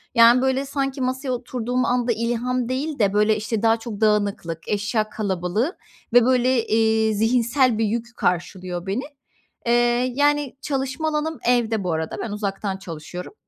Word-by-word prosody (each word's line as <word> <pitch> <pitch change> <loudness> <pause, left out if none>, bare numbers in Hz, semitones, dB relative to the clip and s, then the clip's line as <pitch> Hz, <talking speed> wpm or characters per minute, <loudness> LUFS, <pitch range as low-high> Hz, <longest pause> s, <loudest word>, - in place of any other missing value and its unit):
Yani, 235 +2 +7
böyle, 265 +1 +1
sanki 275 -1 -2
masaya 260 +1 -2
oturduğum 250 0 -2
anda 245 0 +1
ilham 240 +2 -1
değil 280 +3 -2
de, 200 -2 +2
böyle, 210 +1 +3
işte, 215 0 -2
daha 225 0 +4
çok 225 -2 -7
dağınıklık, 200 -6 0
eşya 215 +1 0
kalabalığı 205 - -2 0.4
ve, 245 -1 +7
böyle, 255 -2 +2
eee, 220 0 +2
zihinsel 235 +3 +2
bir 225 - +1
yük 235 +2 -3
karşılıyor 180 0 -2
beni. 200 +7 -2 0.6
Eee, 240 +1 +2
yani, 290 -1 +1
çalışma 275 +2 -2
alanım 310 +1 -2
evde 230 -4 +2
bu 175 -2 -1
arada, 160 0 -3
ben 225 - -4
uzaktan 200 -1 -3
çalışıyorum. 175 - -8
230 Hz, 150 wpm, -23 LUFS, 210-255 Hz, 0.6 s, Yani